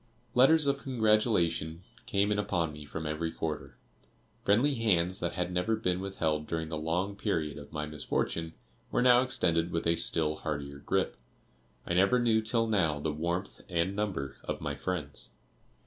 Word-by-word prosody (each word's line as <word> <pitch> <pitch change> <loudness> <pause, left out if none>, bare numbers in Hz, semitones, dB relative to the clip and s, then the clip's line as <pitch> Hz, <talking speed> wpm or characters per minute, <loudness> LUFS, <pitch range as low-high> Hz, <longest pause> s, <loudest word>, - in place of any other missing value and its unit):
Letters 145 +5 +6
of 140 0 +1
congratulation 105 - +1 0.2
came 100 +1 +2
in 105 - +1
upon 85 -6 0
me 75 0 -9
from 80 +2 -6
every 80 +2 -2
quarter. 80 -2 -4 0.7
Friendly 120 +9 +3
hands 95 -7 +1
that 85 0 -2
had 90 0 -2
never 90 +5 +1
been 90 -5 -1
withheld 80 -6 -1
during 80 -1 -2
the 80 - -3
long 90 +6 -1
period 80 -9 -2
of 70 - -12
my 75 -1 -3
misfortune 80 +2 -2 0.3
were 120 - +1
now 125 -1 +7
extended 85 -10 +1
with 85 -1 -2
a 85 0 +4
still 80 -2 +1
heartier 70 -2 -4
grip. - - 0 0.7
I - - -2
never 100 +8 +4
knew 115 -2 +3
till 115 +1 +1
now 90 -9 +1
the 75 +1 -2
warmth 85 +5 -3
and 90 +2 0
number 90 -11 -2
of - - -3
my 75 - -3
friends. 75 -1 -3
85 Hz, 165 wpm, -30 LUFS, 80-105 Hz, 0.7 s, now